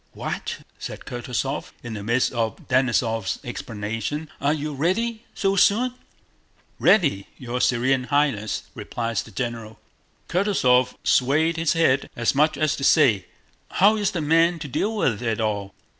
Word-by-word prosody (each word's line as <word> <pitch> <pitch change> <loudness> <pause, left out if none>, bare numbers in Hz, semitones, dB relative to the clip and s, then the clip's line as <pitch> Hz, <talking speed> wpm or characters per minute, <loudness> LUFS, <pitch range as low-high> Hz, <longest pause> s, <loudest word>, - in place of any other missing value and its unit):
"What?" - - -5 0.2
said - - -7
Kutúzov, 125 +2 -4
in 120 -2 -6
the 105 - -5
midst 120 +5 +1
of 115 -2 -1
Denísov's 120 -5 +1
explanations, 115 +8 -4
"are 145 - +2
you 150 -1 -2
ready 220 - -1
so 195 0 +1
soon?" 235 +6 +3 0.9
"Ready, 140 - +3
your 125 -1 -4
Serene 125 +1 +2
Highness," 140 -8 0
replied 115 -1 -4
the - - -2
general. 115 -3 -5 0.5
Kutúzov 130 -10 +2
swayed 155 +6 +2
his 165 -1 +1
head, 140 -5 +2
as 120 -1 +1
much 150 +2 +2
as 155 +1 +1
to 135 - -5
say: 125 - +4 0.5
"How 205 +3 +5
is 205 -2 0
one 155 -4 -2
man 165 +2 +4
to 150 -2 -6
deal 210 - -1
with 120 - 0
it 115 -1 -1
all?" 105 -3 -2
135 Hz, 145 wpm, -23 LUFS, 115-165 Hz, 0.9 s, How